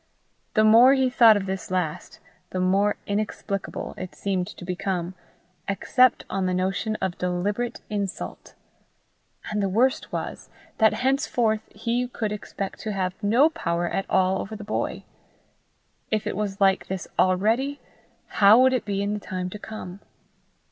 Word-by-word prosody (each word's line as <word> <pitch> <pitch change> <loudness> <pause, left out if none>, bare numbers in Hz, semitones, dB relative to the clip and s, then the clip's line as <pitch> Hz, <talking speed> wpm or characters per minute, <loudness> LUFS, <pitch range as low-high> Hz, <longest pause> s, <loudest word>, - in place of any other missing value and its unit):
The 215 - +5
more 235 +5 +7
he 260 -1 +2
thought 230 -3 +7
of 195 - -3
this 190 -2 -4
last, 180 -4 -3 0.3
the 185 - -3
more 195 +3 +2
inexplicable 200 -1 -3
it 185 -1 -7
seemed 190 -3 -1
to - - -10
become, 180 -1 -3 0.5
except 250 +5 +3
on 190 -1 -1
the 180 - 0
notion 195 +4 -1
of 190 -4 -3
deliberate 200 +7 -2
insult. 200 -2 -5 1.0
And 210 -1 0
the 195 - 0
worst 245 +7 +1
was, - - -5 0.3
that 220 -1 +5
henceforth 245 -4 +1
he 235 +4 -2
could 225 -3 -3
expect 200 -1 -5
to 215 - -4
have 185 -2 -1
no 240 +10 +4
power 175 - -1
at 195 +3 -3
all 190 0 +2
over 215 +3 -6
the 210 - -8
boy! 215 - -3 1.1
If 215 -1 -1
it - - -2
was 200 -1 -3
like 195 -1 +3
this 190 -1 -4
already, 225 +10 +2 0.5
how 205 +2 +6
would 260 0 +5
it 250 -3 -1
be 200 -1 -1
in 205 +1 -1
the 210 - -3
time 185 -2 -5
to 210 - -7
come? 200 -4 -8
205 Hz, 155 wpm, -25 LUFS, 185-220 Hz, 1.1 s, more